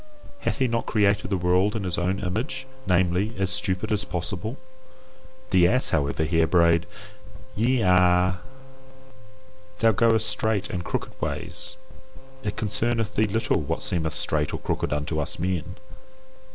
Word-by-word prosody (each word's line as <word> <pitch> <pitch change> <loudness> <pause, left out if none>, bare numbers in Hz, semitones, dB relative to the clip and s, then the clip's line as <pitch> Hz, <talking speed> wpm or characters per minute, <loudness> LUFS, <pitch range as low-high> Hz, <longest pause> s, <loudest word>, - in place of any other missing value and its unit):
Hath - - -1
he 130 -2 +2
not 115 -1 -2
created 105 -2 +1
the 100 - 0
world 90 +4 +2
in 110 - -2
his 90 -2 -1
own 95 +3 -1
image, 120 +8 -3 0.2
namely, 90 +4 +1
as 95 -2 0
stupid 95 +3 +1
as 105 -1 +1
possible? 100 +6 -4 0.9
The 90 -2 +5
ass, 125 +7 +3
however, 70 0 0
here 80 +1 +2
brayed 85 -1 +3 0.7
YE 120 +3 +2
A. 90 0 +3 1.4
Thou 115 +1 +4
goest 110 0 +3
straight 105 -1 +2
and 90 -1 -3
crooked - - -4
ways; - - -3 0.6
it 105 -5 -4
concerneth 110 +1 -1
thee 110 - +3
little 110 -3 0
what 80 +3 -3
seemeth 80 -4 -1
straight 75 -2 -1
or - - -5
crooked - - -2
unto 75 +2 -2
us 75 - 0
men. 90 +1 -3
95 Hz, 145 wpm, -25 LUFS, 85-110 Hz, 1.4 s, The